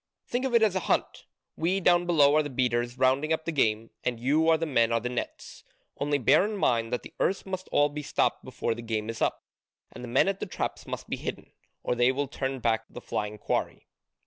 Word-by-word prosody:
Think 245 +2 -2
of 255 -3 0
it 230 - +5
as 210 -4 +3
a - - +2
hunt: - - 0 0.3
we 180 +4 0
down 175 -1 +3
below 150 -4 +5
are 155 - +5
the 145 - -4
beaters 120 -2 0
rounding 130 +4 +2
up 160 0 0
the 165 - -1
game, 115 -6 +1
and 120 -2 -1
you 150 +6 +2
are 160 - +5
the 165 - -2
men 115 -6 +2
at 115 -1 +1
the 125 - -1
nets: 125 - -6 0.4
only 145 0 +1
bear 130 +6 +4
in 210 +1 -2
mind 115 -9 +1
that 125 - -2
the - - -11
earths 195 - 0
must 185 -1 -5
all 145 - +4
be 150 +1 -6
stopped 145 - 0
before 115 - -2
the 120 - -8
game 110 -1 -2
is 115 - -9
up, - - 0 0.5
and 125 - -10
the - - -6
men 125 +9 +3
at 195 0 -1
the - - -4
traps - - -4
must - - -6
be - - -3
hidden, - - -6 0.3
or - - 0
they 120 +1 +3
will 140 +2 -2
turn 135 0 -3
back 115 -2 0
the - - -9
flying 105 0 -4
quarry. - - -2
135 Hz, 240 wpm, -28 LUFS, 120-165 Hz, 0.5 s, it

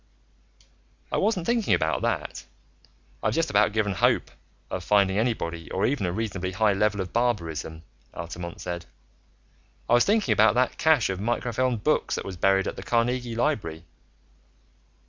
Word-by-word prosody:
"I - - 0
wasn't 195 -6 +1
thinking 235 0 +2
about 80 -1 0
that. - - -2 0.8
I've - - 0
just 165 0 0
about 105 0 +4
given 105 -1 0
up 95 - -5
hope - - +2 0.4
of - - -3
finding 100 -1 +3
anybody 85 -8 -2
or 95 - 0
even 130 -8 0
a - - -1
reasonably 95 -2 -3
high 105 +2 +3
level 105 0 +1
of 90 - -6
barbarism," 85 -9 -1 0.3
Altamont 85 +1 -7
said. 85 -1 -5 1.0
"I - - +2
was 120 - +6
thinking 210 +1 +2
about 110 +2 +4
that 125 +1 +1
cache 155 -10 +3
of 95 - -4
microfilmed 120 +1 -1
books 155 - +1
that - - -5
was 95 - -6
buried 95 +2 +2
at - - -4
the - - -5
Carnegie 120 0 0
Library." 100 - -1
105 Hz, 160 wpm, -26 LUFS, 90-125 Hz, 1.0 s, was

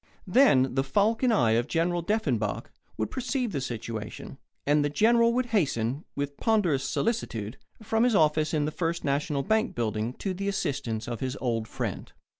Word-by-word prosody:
Then 180 - +4
the 135 0 +1
falcon 220 - +2
eye 120 - +3
of 115 +2 +2
General 175 +1 0
Deffenbaugh 150 - -1 0.3
would 110 - -2
perceive 255 -2 -2
the 140 - -2
situation, 115 +1 -6 0.3
and 145 +1 +3
the 145 - +1
General 230 +9 +4
would 250 +1 +1
hasten, 140 - 0
with 140 0 -3
ponderous 185 - +2
solicitude, 125 - -2 0.3
from 225 +2 +1
his 245 -3 +3
office 155 -2 +3
in 150 -2 +1
the 155 - -2
First 170 +1 -2
National 140 0 0
Bank 220 +5 +1
building 110 0 -1
to 190 +7 -4
the 195 +2 -4
assistance 140 - -2
of 120 -2 -4
his 130 0 -3
old 115 -3 -1
friend. - - -5
145 Hz, 170 wpm, -27 LUFS, 125-205 Hz, 0.3 s, Then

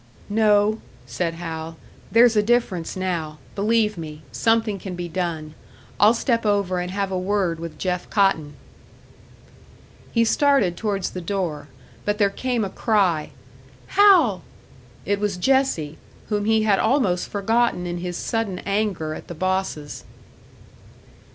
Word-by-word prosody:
"No," 210 0 +3 0.2
said 165 +7 -3
Hal. 165 -1 -6 0.3
"There's 230 0 +6
a 210 - +5
difference 210 -7 0
now. 170 -5 -3 0.2
Believe 210 -1 +1
me 155 -1 -8
something 215 - +1
can 185 -1 -6
be 175 0 -4
done. 165 -3 -3 0.5
I'll 215 +3 +6
step 230 0 0
over 200 -4 +1
and 180 0 -3
have 195 +1 -2
a 185 - -1
word 185 -3 0
with 165 -1 -7
Jeff 180 -1 -2
Cotton." 160 -8 +1 1.6
He 230 -1 +3
started 270 -8 +3
towards 200 -2 -2
the 180 - -6
door; 165 -6 -3 0.4
but 205 0 -1
there 200 -2 +3
came 245 0 -1
a - - -4
cry: 190 -10 +1 0.6
"Hal!" 345 - +5 0.6
It 200 0 0
was 205 -3 -1
Jessie, 180 - +1 0.3
whom 205 -1 0
he 220 0 +3
had 205 -3 +3
almost 220 -8 +1
forgotten 225 -2 +1
in 175 0 -3
his 175 0 -4
sudden 225 -5 -2
anger 200 -6 -1
at - - -9
the 175 - -7
bosses. 185 -4 -2
195 Hz, 140 wpm, -23 LUFS, 175-220 Hz, 1.6 s, There's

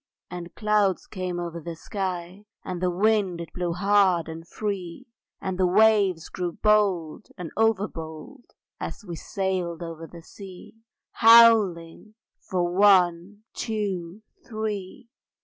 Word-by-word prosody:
And 175 -1 -8
clouds 210 -4 +1
came 180 -2 -5
over 170 -1 -5
the 170 +1 -7
sky, 185 +2 -5 0.2
And 180 -1 -5
the 180 - +1
wind 195 -1 +1
it 170 - -8
blew 175 -1 -2
hard 190 -2 +2
and 165 +1 -9
free, 200 +1 -5 0.3
And 190 -1 -4
the 185 - +3
waves 200 -3 +3
grew 175 -2 -4
bold 200 -6 +1
and 175 -4 -7
over 220 -2 +2
bold 160 - -10 0.3
As 215 - -7
we 175 -3 -6
sailed 180 -1 -3
over 165 -1 -8
the 170 0 -13
sea; 190 0 -12 0.4
Howling 215 -5 +5 0.2
for 180 -2 -2
One, 190 0 +3
Two, 200 -3 -4 0.2
Three! 215 +1 -6
185 Hz, 130 wpm, -25 LUFS, 170-210 Hz, 0.4 s, Howling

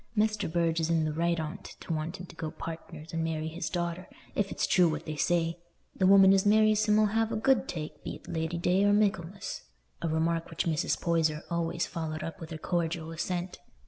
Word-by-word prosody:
Mester 215 -1 +1
Burge 165 0 +1
is 160 0 0
in 165 -2 +2
the 155 - -1
right 170 +1 +1
on't 155 0 -5
to 165 - -6
want 160 +3 -3
him 180 - -7
to 175 - -14
go 160 -1 -4
partners 165 0 -8
and 165 0 0
marry 160 -1 -2
his 165 +1 -4
daughter, 175 +1 -3 0.3
if 200 -2 0
it's - - 0
true 180 -2 +4
what 155 0 -4
they 155 - -4
say; 165 +2 +1 0.4
the 185 - +3
woman 195 0 +8
as 195 -1 +4
marries 215 0 +4
him 210 -1 +4
'ull 215 - +5
have 225 +2 +1
a - - -1
good 265 +4 +2
take, 155 -3 -6
be't - - -7
Lady 160 0 -2
day 180 +3 +2
or 205 0 +4
Michaelmas," 195 -3 0 0.4
a - - -1
remark 165 +1 0
which 165 - -2
Mrs. 160 0 0
Poyser 160 -3 +1
always 170 0 0
followed 155 -1 -4
up 165 - -6
with 165 - -8
her 160 - -5
cordial 165 -1 -2
assent. 175 +2 -3
170 Hz, 215 wpm, -29 LUFS, 160-190 Hz, 0.4 s, woman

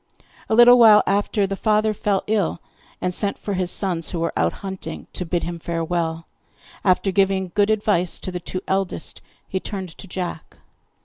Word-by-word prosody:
A 220 - +2
little 240 +1 +8
while 215 -3 +8
after, 200 +1 +1
the 195 0 -3
father 215 +1 +1
fell 200 -1 0
ill, 205 -6 0 0.4
and 180 - -1
sent 200 +2 -1
for 205 - -4
his 185 -2 -1
sons, 180 -4 0
who 170 - -4
were 165 0 -1
out - - +2
hunting, 190 -1 -6
to 180 - -4
bid 175 0 -1
him 170 0 -4
farewell. 165 0 -2 0.6
After 190 +1 +2
giving 190 -1 +1
good 205 0 +2
advice 205 -5 +1
to 185 - -6
the 180 - -4
two 185 +1 -5
eldest, 190 -3 -2 0.3
he 190 - -2
turned 190 -2 -5
to 195 - -9
Jack. 180 -3 -6
190 Hz, 180 wpm, -22 LUFS, 175-205 Hz, 0.6 s, little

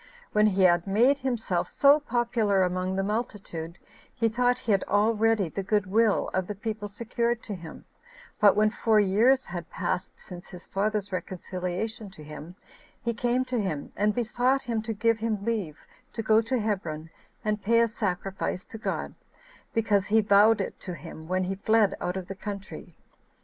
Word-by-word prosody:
When 210 0 +4
he 195 -2 +2
had 175 0 +4
made 245 +8 +4
himself 235 -9 -1
so 285 +1 +5
popular 235 -7 +1
among 185 +1 -1
the 195 - 0
multitude, 195 -6 -4 0.4
he 230 -3 +2
thought 245 +2 +2
he 240 -3 -2
had 195 -2 +3
already 215 -1 +2
the 195 - -4
good 205 +1 +1
will 215 +2 +2
of 185 -1 0
the 210 - -4
people 215 +1 -4
secured 235 +3 -2
to 210 - -5
him; 170 -4 -9 0.5
but 205 -2 +6
when 215 +1 +3
four 225 -2 +2
years 220 +7 +4
16 190 - -12
had 175 -2 -5
passed 180 0 -2
since 180 -1 -11
his 180 -2 -10
father's 205 0 -1
reconciliation 185 +3 -4
to 170 -5 -13
him, 155 +3 -9 0.5
he 235 0 0
came 245 +3 0
to 250 -2 -1
him, 155 -8 -3
and 210 0 +1
besought 245 +3 +1
him 230 -2 -1
to 225 +1 -3
give 225 +1 +1
him 215 -3 -2
leave 205 -10 -2 0.4
to 225 - -3
go 220 0 +4
to 230 +3 -1
Hebron, 165 -7 -3 0.3
and 210 -1 0
pay 230 +3 +3
a 230 - +4
sacrifice 195 -3 -3
to 225 - -7
God, - - -3 0.6
because 210 -3 +1
he 220 +2 +4
vowed 205 +2 +5
it - - -5
to 180 -3 -6
him 160 +1 -10
when 185 +1 0
he 185 +1 -2
fled 215 +1 +2
out 180 +1 -2
of 185 -2 -6
the 195 - -5
country. 200 +1 -8
210 Hz, 180 wpm, -27 LUFS, 185-225 Hz, 0.6 s, but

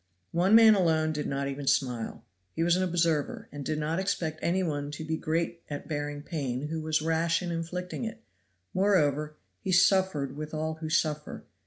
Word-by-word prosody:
One 180 +5 +4
man 225 -1 +9
alone 160 -5 +2
did 150 -1 -3
not 140 0 -1
even 140 0 -5
smile. 120 -4 0 0.3
He 165 - +1
was 170 +1 +4
an 185 - +1
observer, 170 -4 0
and 145 0 -6
did 155 +2 -2
not 155 +3 -1
expect 160 -5 -1
any 185 +2 +1
one 145 -4 -2
to 150 +2 -6
be 160 +1 -1
great 165 +2 -2
at 145 -1 -5
bearing 145 -1 -3
pain 140 -3 -3
who 160 0 -3
was 155 0 0
rash 165 +2 +1
in 175 - -3
inflicting 180 +5 -4
it; 225 - -7 0.5
moreover, 155 -6 +2 0.2
he 190 - -3
suffered 180 -7 +3
with 155 +1 -6
all 160 +1 -1
who 155 - -3
suffer. 155 -2 -1
160 Hz, 185 wpm, -29 LUFS, 150-175 Hz, 0.5 s, man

